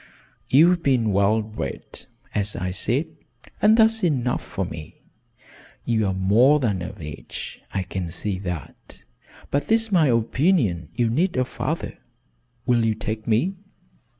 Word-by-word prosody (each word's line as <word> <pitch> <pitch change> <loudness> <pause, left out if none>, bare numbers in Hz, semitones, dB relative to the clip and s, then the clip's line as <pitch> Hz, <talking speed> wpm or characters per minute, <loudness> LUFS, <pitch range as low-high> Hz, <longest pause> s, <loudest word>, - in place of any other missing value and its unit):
You've 170 +6 +5
been 125 -7 +2
well 100 +3 +3
bred, 105 -10 -6 0.3
as 105 0 0
I 90 +1 -2
said, 120 - 0 0.6
and 215 +2 +6
that's 225 -1 +4
enough 130 -8 +1
for - - -4
me. 75 -1 -8 0.9
You're 110 -5 +1
more 115 +10 +4
than 105 -9 0
of 90 - -7
age 75 -2 -7
I 95 - -1
can 90 -1 -4
see 95 +2 -3
that 90 -7 -7 0.5
but 145 +9 -1
it's 225 -1 +3
my 170 -6 +4
opinion 115 - +1
you 120 - +2
need 160 +9 0
a 130 - +2
father. - - -4 0.7
Will 120 -2 +3
you 110 -1 +1
take 110 0 -5
me?" 150 - +1
115 Hz, 140 wpm, -23 LUFS, 95-150 Hz, 0.9 s, and